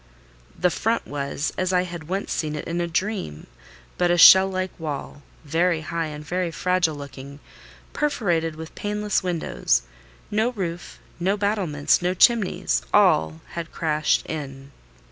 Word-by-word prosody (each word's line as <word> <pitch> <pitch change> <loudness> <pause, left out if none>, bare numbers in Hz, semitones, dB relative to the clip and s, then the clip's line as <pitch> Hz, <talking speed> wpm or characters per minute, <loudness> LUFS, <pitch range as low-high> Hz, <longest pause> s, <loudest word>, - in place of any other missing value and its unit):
The 180 - +2
front 225 +5 -1
was, 140 +1 -3
as 185 0 0
I 180 -1 +2
had 170 -3 -8
once 195 +3 -3
seen 150 -1 -2
it 150 - -5
in 170 +1 -2
a 170 - -1
dream, 170 - -3 0.5
but 175 -1 +3
a 175 - +3
shell 190 +3 +9
like 185 -1 -2
wall, 145 -2 -5 0.2
very 165 +2 +1
high 165 0 -3
and 150 0 -8
very 180 +2 -1
fragile 180 -1 0
looking, 140 0 -10 0.5
perforated 175 - 0
with 160 0 -9
paneless 210 0 -1
windows: 175 - 0 0.5
no 220 +4 +1
roof, 175 -5 -5 0.2
no 190 +4 +1
battlements, 195 -10 +1
no 180 +1 0
chimneys—all 80 - +3
had 170 -1 -6
crashed 155 -2 0
in. 140 -3 -7
170 Hz, 145 wpm, -23 LUFS, 150-185 Hz, 0.5 s, shell